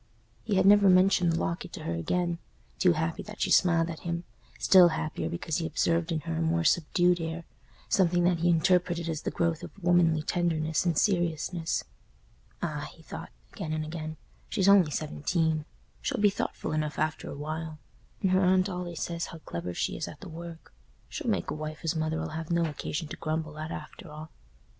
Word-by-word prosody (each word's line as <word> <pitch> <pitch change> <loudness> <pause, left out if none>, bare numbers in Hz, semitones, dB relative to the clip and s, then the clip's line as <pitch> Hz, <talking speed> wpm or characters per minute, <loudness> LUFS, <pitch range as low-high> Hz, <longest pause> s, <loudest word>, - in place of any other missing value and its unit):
He 205 - -1
had 190 0 +4
never 200 0 +7
mentioned 185 -1 +5
the 165 - 0
locket 170 +1 -3
to - - -7
her 85 - -2
again; 170 - -1 0.4
too 180 -2 +5
happy 160 +1 -2
that 210 0 -10
she - - 0
smiled 170 -2 +4
at 165 -2 -6
him—still 170 - +3
happier 160 -1 -2
because 170 -2 -2
he 165 -2 -1
observed 165 +1 +1
in 160 -2 -1
her 165 0 -3
a - - 0
more 165 +1 +1
subdued 175 +2 +3
air, 165 +1 -4 0.4
something 175 -2 +3
that 175 -1 +3
he 175 +1 +2
interpreted 170 0 +2
as 160 -2 -2
the - - -2
growth 170 -2 0
of - - -7
womanly 170 -3 +3
tenderness 160 -1 0
and 165 -3 +1
seriousness. 175 -3 0 0.8
"Ah!" - - -3
he - - -18
thought, - - -8 0.2
again 155 - -4
and 155 0 -2
again, 155 -1 -5 0.3
"she's 195 -1 +1
only 195 -5 +7
seventeen; 155 +1 -1 0.4
she'll - - -1
be 205 -1 +5
thoughtful - - -3
enough 155 -1 -1
after 155 0 -1
a - - -6
while. 155 +1 -5 0.5
And 190 - +3
her 185 +1 +4
aunt 185 +1 +3
allays 180 -3 -4
says 170 -1 -3
how 165 - -9
clever 85 +1 -4
she - - -1
is - - -3
at - - -10
the - - -8
work. 165 - -9 0.4
She'll - - -3
make - - 0
a - - -1
wife 155 0 -6
as 165 +1 0
Mother'll 160 +1 -1
have 160 0 -5
no 170 -1 +2
occasion 150 +1 -4
to - - -6
grumble 155 -1 -3
at, 155 +1 -4
after 180 +1 -8
all." 155 +1 -9
165 Hz, 195 wpm, -29 LUFS, 155-175 Hz, 0.8 s, never